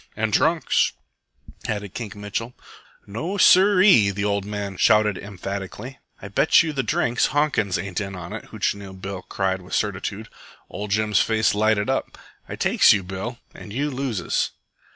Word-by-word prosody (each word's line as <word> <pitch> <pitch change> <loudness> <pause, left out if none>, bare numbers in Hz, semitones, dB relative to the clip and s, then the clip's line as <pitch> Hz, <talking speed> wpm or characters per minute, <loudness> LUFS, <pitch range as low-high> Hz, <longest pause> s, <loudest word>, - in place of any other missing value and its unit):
"And - - -1
drunks," - - +2 0.7
added 105 -3 -4
Kink 110 -4 -6
Mitchell. 105 +4 -5 0.5
"No 160 - -4
sir 190 0 +6
ee!" 120 - +6
the 100 +1 -2
old 100 -1 0
man 100 -2 -5
shouted 105 0 +4
emphatically. 100 +5 -7 0.2
"I - - -8
bet 100 - +4
you 160 -2 -3
the 135 - 0
drinks 120 -2 +1
Honkins 145 -10 0
ain't 100 0 -4
in 95 -1 -5
on 90 -1 -8
it!" - - -7
Hootchinoo 100 -1 -3
Bill 95 0 -6
cried 95 -1 -2
with 90 - -5
certitude. 100 +1 -3 0.4
Ol' 105 - -5
Jim's 105 0 +1
face 110 0 +2
lighted 105 0 +1
up. - - -2 0.3
"I - - -5
takes - - +5
you, 100 - -1
Bill, 95 +7 -6 0.2
an' - - -11
you 140 +8 -2
loses." 125 -9 -1
105 Hz, 160 wpm, -23 LUFS, 100-120 Hz, 0.7 s, sir